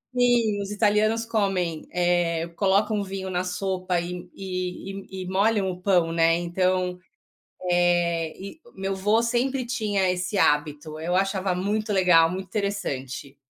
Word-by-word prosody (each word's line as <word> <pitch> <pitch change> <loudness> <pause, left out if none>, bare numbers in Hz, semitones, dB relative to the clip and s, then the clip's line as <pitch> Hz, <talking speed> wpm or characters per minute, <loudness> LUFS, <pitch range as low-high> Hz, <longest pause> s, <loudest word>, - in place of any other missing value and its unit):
Sim, 240 -4 +3
os 195 - -5
italianos 215 +2 +2
comem, 195 -7 -1
eh, 175 -2 +1
colocam 205 +3 +2
vinho 190 -1 -5
na 180 0 0
sopa 185 -1 -1
e 175 +1 -6
e 185 0 -4 0.2
e 190 -1 -6
e - - -8
molham 195 0 +2
o 180 - -9
pão, 180 -4 +2
né, 165 0 +3
então, 180 +1 0 0.7
eh, 175 -2 +2
e 200 - -9 0.2
meu 195 0 -2
vô 210 +4 +2
sempre 250 +2 0
tinha 205 -5 0
esse 180 +3 -2
hábito. 150 -1 +1
Eu 170 +3 -1
achava 195 -1 0
muito 210 +3 -1
legal, 180 -4 +5
muito 190 +2 -5
interessante. 140 - -4
185 Hz, 140 wpm, -25 LUFS, 175-205 Hz, 0.7 s, legal